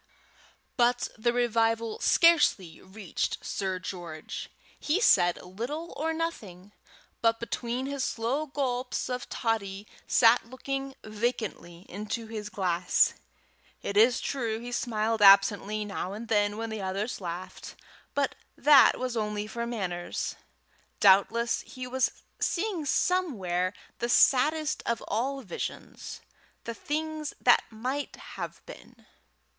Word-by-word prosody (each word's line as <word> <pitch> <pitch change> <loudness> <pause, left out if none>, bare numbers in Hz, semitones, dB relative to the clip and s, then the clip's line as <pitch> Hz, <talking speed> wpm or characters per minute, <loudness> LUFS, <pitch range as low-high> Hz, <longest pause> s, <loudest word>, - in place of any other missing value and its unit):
But 245 0 +2
the 235 +1 +1
revival 230 -2 +1
scarcely 295 - +4
reached 190 -1 -3
Sir 190 -2 -2
George. 175 -4 -7 0.3
He 310 +6 +1
said 175 - +4
little 245 - -5
or 320 +2 -1
nothing, 210 - -5 0.5
but, 230 0 +3
between 240 +2 -3
his 280 -1 -2
slow 255 +8 -1
gulps 255 -3 -2
of 250 -1 -4
toddy, 205 -4 -2 0.2
sat 235 +1 +5
looking 270 +1 -4
vacantly 215 -5 -3
into 210 +4 -4
his 215 -2 -6
glass. 180 -3 +2 0.7
It 200 - -3
is 235 +4 +5
true 230 -5 -2
he 240 +2 -7
smiled 225 -2 -1
absently 205 +1 +5
now 195 -2 -4
and 220 +2 -7
then 205 -1 +2
when 225 0 -4
the 220 -2 -4
others 195 +4 -3
laughed, 175 +1 -7 0.4
but 280 -2 +1 0.2
that 285 0 +7
was 255 -1 -3
only 210 -1 -2
for 235 +2 -4
manners. 180 -7 -3 0.7
Doubtless 210 +4 +4
he 255 0 -8
was 260 +1 -1 0.2
seeing 365 -4 -1
somewhere 195 - +1 0.3
the 240 - -1
saddest 305 +5 +3
of 235 -1 -1
all 265 +6 -1
visions 180 -6 -6 0.4
the 230 - -4
things 305 +4 -3
that 245 - +5
might 255 +6 -4
have - - -8
been. - - -13
230 Hz, 120 wpm, -28 LUFS, 200-260 Hz, 0.7 s, that